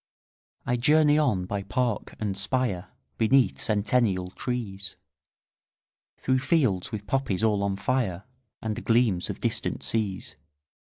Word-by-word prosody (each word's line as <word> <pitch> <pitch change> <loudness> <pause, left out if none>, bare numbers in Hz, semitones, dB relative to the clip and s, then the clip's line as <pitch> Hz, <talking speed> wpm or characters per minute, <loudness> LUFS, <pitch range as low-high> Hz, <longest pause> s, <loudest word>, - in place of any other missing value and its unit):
20 125 - 0
I - - -7
journey 150 +2 +5
on 105 -12 +1
by 100 +2 -3
park 120 +1 -2
and 105 -3 -2
spire, 100 -2 -1 0.3
Beneath 115 - +3
centennial 100 - +1
trees, 100 -6 -4 1.2
Through 130 0 +1
fields 130 - +1
with 105 -2 -5
poppies 110 -5 0
all 105 -2 +3
on 100 -1 0
fire, 100 -4 -1 0.4
And 110 -1 -3
gleams 115 -6 +2
of - - -4
distant - - -1
seas. 105 -4 -2
110 Hz, 125 wpm, -27 LUFS, 95-125 Hz, 1.2 s, journey